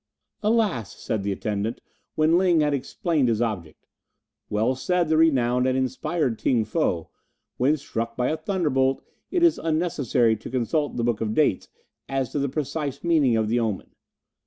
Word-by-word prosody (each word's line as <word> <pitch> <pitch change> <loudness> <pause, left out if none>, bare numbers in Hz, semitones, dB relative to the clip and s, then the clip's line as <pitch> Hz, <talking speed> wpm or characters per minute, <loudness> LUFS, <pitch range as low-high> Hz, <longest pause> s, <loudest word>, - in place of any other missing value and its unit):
"Alas!" 210 - 0
said 110 - -3
the 100 +1 -2
attendant, 105 +2 -2 0.4
when 155 +2 +3
Ling 175 -3 +4
had 150 -1 +1
explained 145 +1 0
his 110 -2 +1
object, 100 -10 -3 0.6
"well 110 +5 +1
said 170 +5 0
the 160 - +3
renowned 130 -6 +3
and 130 0 +1
inspired 130 0 -1
Ting 115 -4 +1
Fo, 85 -5 -1 0.5
'When 140 +5 +2
struck 115 -4 -4
by 125 - +1
a 160 - -1
thunderbolt 150 -7 0 0.3
it 355 -2 0
is 340 -2 +4
unnecessary 150 -8 +1
to 110 - -9
consult 130 +5 -1
the 120 - 0
Book 115 -3 0
of 110 -1 -1
Dates 145 -11 +2 0.4
as 135 -3 -1
to 145 - -1
the 140 0 0
precise 140 0 -3
meaning 150 -9 +3
of 110 -1 +1
the 120 +3 +1
omen. 110 -5 -3
130 Hz, 165 wpm, -24 LUFS, 115-155 Hz, 0.6 s, Ling